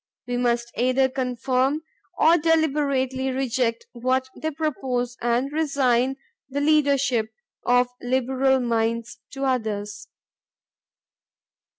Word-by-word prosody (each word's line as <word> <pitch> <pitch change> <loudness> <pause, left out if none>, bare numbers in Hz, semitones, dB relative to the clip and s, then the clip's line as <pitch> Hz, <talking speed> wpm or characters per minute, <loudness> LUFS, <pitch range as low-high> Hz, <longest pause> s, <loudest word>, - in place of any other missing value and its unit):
We 245 - -2
must 240 -1 0
either 255 +2 +2
conform 260 +3 0 0.3
or 330 +2 +6
deliberately 285 -5 +1
reject 255 -3 -1
what 255 +2 0
they 315 - -3
propose 260 -6 -2
and 240 +4 0
resign 270 -4 +1 0.3
the 280 +1 -2
leadership 280 -6 +2 0.4
of 245 0 +4
liberal 260 +1 +1
minds 230 0 -1
to 275 0 -3
others. 210 -5 -2
260 Hz, 95 wpm, -24 LUFS, 240-275 Hz, 0.4 s, or